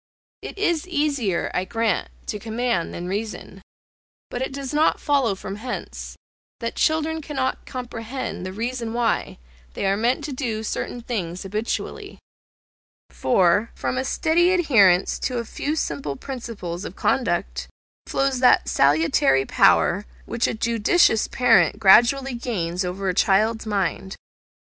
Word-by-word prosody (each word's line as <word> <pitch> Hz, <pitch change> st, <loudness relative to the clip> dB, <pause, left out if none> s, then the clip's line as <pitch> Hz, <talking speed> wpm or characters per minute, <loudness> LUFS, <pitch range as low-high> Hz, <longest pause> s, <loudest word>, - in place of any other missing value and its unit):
It -, -, -8 dB
is 345 Hz, -4 st, 0 dB
easier, 285 Hz, -, 0 dB
I 180 Hz, -, 0 dB
grant, 225 Hz, 0 st, -1 dB, 0.2 s
to 210 Hz, -, -4 dB
command 225 Hz, -4 st, -1 dB
than 175 Hz, +1 st, -6 dB
reason; 210 Hz, +3 st, -5 dB, 0.7 s
but 245 Hz, -, -4 dB
it 265 Hz, -, -2 dB
does 275 Hz, 0 st, -6 dB
not 305 Hz, +2 st, +3 dB
follow 270 Hz, -8 st, +1 dB
from 195 Hz, +1 st, -7 dB
hence, 245 Hz, +3 st, -6 dB, 0.4 s
that 230 Hz, -1 st, -3 dB
children 315 Hz, 0 st, +1 dB
cannot 275 Hz, -3 st, -3 dB
comprehend 245 Hz, -2 st, -5 dB
the 185 Hz, -, -5 dB
reason 230 Hz, +2 st, -4 dB
why 235 Hz, -2 st, 0 dB, 0.4 s
they -, -, -2 dB
are 195 Hz, 0 st, +2 dB
made 240 Hz, +7 st, 0 dB
to 285 Hz, -1 st, -4 dB
do 230 Hz, -5 st, -3 dB
certain 240 Hz, +2 st, -4 dB
things 185 Hz, -7 st, -4 dB
habitually; 210 Hz, +4 st, -4 dB, 0.9 s
for, 200 Hz, 0 st, +2 dB
from -, -, -2 dB
a 260 Hz, -, -1 dB
steady 335 Hz, +6 st, +2 dB
adherence 205 Hz, -, +4 dB
to 250 Hz, -1 st, -2 dB
a 235 Hz, -, -2 dB
few 295 Hz, +6 st, -3 dB
simple 145 Hz, -, -3 dB
principles 200 Hz, -, -6 dB
of -, -, -7 dB
conduct 65 Hz, -, -1 dB, 0.4 s
flows 270 Hz, -2 st, 0 dB
that 250 Hz, -, +4 dB
salutary 140 Hz, -2 st, +3 dB
power, 195 Hz, +8 st, +3 dB, 0.2 s
which 235 Hz, 0 st, -1 dB
a -, -, -2 dB
judicious 230 Hz, +2 st, +3 dB
parent 255 Hz, -2 st, +3 dB
gradually 245 Hz, +7 st, +5 dB
gains 190 Hz, -7 st, -2 dB
over 185 Hz, +2 st, -3 dB
a 185 Hz, -, +1 dB
child's 215 Hz, +4 st, +2 dB
mind. 195 Hz, -2 st, -2 dB
230 Hz, 140 wpm, -23 LUFS, 190-260 Hz, 0.9 s, gradually